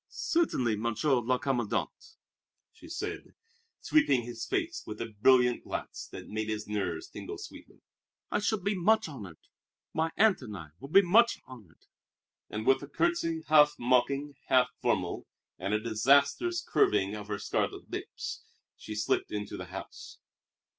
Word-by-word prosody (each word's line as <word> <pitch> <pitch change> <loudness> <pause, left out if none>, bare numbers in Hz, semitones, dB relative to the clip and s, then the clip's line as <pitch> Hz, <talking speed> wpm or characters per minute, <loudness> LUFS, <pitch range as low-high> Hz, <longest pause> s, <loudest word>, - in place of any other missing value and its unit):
"Certainly, 130 - 0
Monsieur 115 +5 +1
le 125 +2 +1
Commandant," 125 -5 -1 0.8
she - - -15
said, - - -5 0.5
sweeping 140 - +3
his 115 -1 -6
face 335 0 -1
with 105 0 -6
a 115 -1 -5
brilliant 125 -1 +5
glance - - -5
that - - -9
made 110 0 -3
his 105 -1 -3
nerves 95 -6 -2
tingle - - -7
sweetly; - - -12 0.5
"I - - +1
shall 215 +1 +1
be 200 +2 0
much 215 +3 +3
honored. 100 - -9 0.6
My 160 +1 +1
aunt 215 -5 +4
and 105 -5 -7
I 80 -4 -9
will 140 - -9
be 195 +6 +7
much 225 +7 +5
honored!" 110 -10 -15 0.6
And 110 +1 -4
with 135 - +4
a 140 - -7
curtsy 335 - 0
half 150 -1 +6
mocking, 135 +4 +1
half 125 -1 +4
formal, - - -1 0.3
and 100 - -2
a 105 - +2
disastrous 140 - +2
curving 100 -1 +2
of 105 -1 -6
her 105 -1 -2
scarlet 100 - -2
lips, - - -5 0.3
she 110 - -8
slipped 110 - 0
into 105 -1 -4
the - - -6
house. - - -9
125 Hz, 155 wpm, -30 LUFS, 105-165 Hz, 0.8 s, be